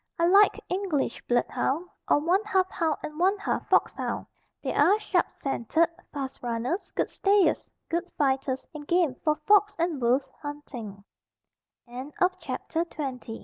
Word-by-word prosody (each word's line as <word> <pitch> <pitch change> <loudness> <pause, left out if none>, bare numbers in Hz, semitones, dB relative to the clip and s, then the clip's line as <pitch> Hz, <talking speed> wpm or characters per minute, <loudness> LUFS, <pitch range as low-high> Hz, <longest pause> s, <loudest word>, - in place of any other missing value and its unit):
I 335 - +3
like 395 +4 +6
English 365 -7 -1
blood 240 0 +2
hound 320 +7 -1 0.2
or - - +6
one 350 +7 +2
half 380 -3 +1
hound 320 -3 0
and 300 +1 -6
one 385 +3 +3
half 405 - -3
fox - - +3
hound. - - -3 0.4
They - - -1
are 415 +2 +4
sharp 425 - +1
scented, 275 +5 0 0.2
fast 270 -2 -5
runners, 245 - -2
good - - 0
stayers, 400 -1 +2 0.2
good 345 +2 -2
fighters 265 -2 0
and 295 -1 -8
game 345 -6 +3
for 305 -1 +3
fox 410 +7 +3
and 335 -5 -1
wolf 245 +4 +3 0.2
hunt 290 0 -7
325 Hz, 140 wpm, -27 LUFS, 275-375 Hz, 0.4 s, like